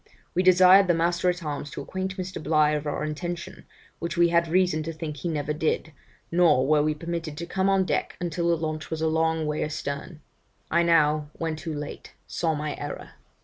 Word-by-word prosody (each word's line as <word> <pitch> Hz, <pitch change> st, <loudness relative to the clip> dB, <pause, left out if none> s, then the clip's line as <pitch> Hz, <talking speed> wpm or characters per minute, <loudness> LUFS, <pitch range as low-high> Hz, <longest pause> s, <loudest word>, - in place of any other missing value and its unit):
We 180 Hz, -, +2 dB
desired 185 Hz, +1 st, +7 dB
the 175 Hz, -, +3 dB
master 175 Hz, +2 st, +1 dB
at 180 Hz, 0 st, -2 dB
arms 145 Hz, -1 st, -4 dB
to -, -, -6 dB
acquaint 190 Hz, +4 st, -4 dB
Mr. 185 Hz, -2 st, -5 dB
Bligh 155 Hz, -1 st, +3 dB
of 150 Hz, 0 st, -3 dB
our 145 Hz, -, -2 dB
intention, 170 Hz, +3 st, -5 dB, 0.3 s
which 170 Hz, 0 st, -4 dB
we 170 Hz, 0 st, +5 dB
had 170 Hz, 0 st, +3 dB
reason 180 Hz, -2 st, +2 dB
to 160 Hz, +1 st, -4 dB
think 155 Hz, -2 st, -6 dB
he 170 Hz, -, -3 dB
never 150 Hz, -2 st, -2 dB
did, 155 Hz, +1 st, -1 dB, 0.4 s
nor 165 Hz, -6 st, +4 dB
were 150 Hz, +1 st, +4 dB
we 155 Hz, 0 st, +1 dB
permitted 165 Hz, -1 st, -5 dB
to 170 Hz, -, -4 dB
come 190 Hz, +3 st, 0 dB
on 195 Hz, -1 st, +3 dB
deck 165 Hz, -, -2 dB
until 170 Hz, -1 st, -1 dB
the 170 Hz, -, +3 dB
launch 155 Hz, -1 st, -4 dB
was 160 Hz, 0 st, -3 dB
a -, -, +3 dB
long 160 Hz, 0 st, +1 dB
way 150 Hz, 0 st, -1 dB
astern. 150 Hz, +1 st, -5 dB, 0.5 s
I 170 Hz, -, +4 dB
now, 155 Hz, -3 st, +3 dB
when 165 Hz, -1 st, -3 dB
too 155 Hz, 0 st, -5 dB
late, 145 Hz, 0 st, -7 dB
saw 160 Hz, -2 st, -1 dB
my 150 Hz, 0 st, -3 dB
error. 145 Hz, -, -6 dB
160 Hz, 205 wpm, -26 LUFS, 150-175 Hz, 0.5 s, desired